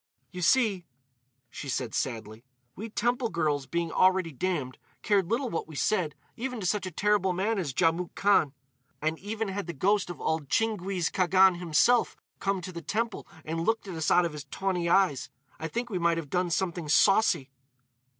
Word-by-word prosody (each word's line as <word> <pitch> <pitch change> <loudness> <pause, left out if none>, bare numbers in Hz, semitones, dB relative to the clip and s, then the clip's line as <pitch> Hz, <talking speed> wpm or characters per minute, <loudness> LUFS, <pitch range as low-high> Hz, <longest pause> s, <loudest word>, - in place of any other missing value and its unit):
"You 180 - -6
see," 195 -2 +2 0.6
she 140 - -7
said 125 -2 -2
sadly, 110 -3 -4 0.3
"we 220 +4 -6
temple 240 +2 0
girls, 150 -6 -1
being 170 -1 -2
already 185 -2 +3
damned, 150 -4 -3 0.2
cared 195 -4 +2
little 245 +4 0
what 165 - -3
we 160 - -11
said, 165 -3 0 0.2
even 250 0 -4
to 195 - -5
such 190 +1 0
a - - -6
terrible 200 +1 +1
man 200 +4 0
as 160 -7 -2
Djamouk 165 +4 0
Khan. 195 -8 +3 0.5
And 155 +1 -1
even 215 +1 -3
had 195 -1 -4
the 170 - -4
ghost 195 +6 +1
of 175 - -7
old 160 -3 -2
Tchinguiz 195 -5 0
Khagan 185 0 +4
himself 180 +8 +2 0.2
come 195 -1 -1
to 185 - -7
the 170 -1 -7
temple 225 +4 -3 0.2
and 165 +1 -3
looked 225 +1 0
at 190 - -5
us 160 -2 -1
out 180 0 +5
of 165 - -3
his 150 -1 -7
tawny 180 +2 -2
eyes, 175 -8 +2 0.3
I 160 - -3
think 240 +7 -4
we 185 - -1
might 170 -1 +2
have 155 -4 -6
done 180 -1 +1
something 170 -2 -2
saucy." 195 -7 +4
180 Hz, 185 wpm, -28 LUFS, 160-205 Hz, 0.6 s, out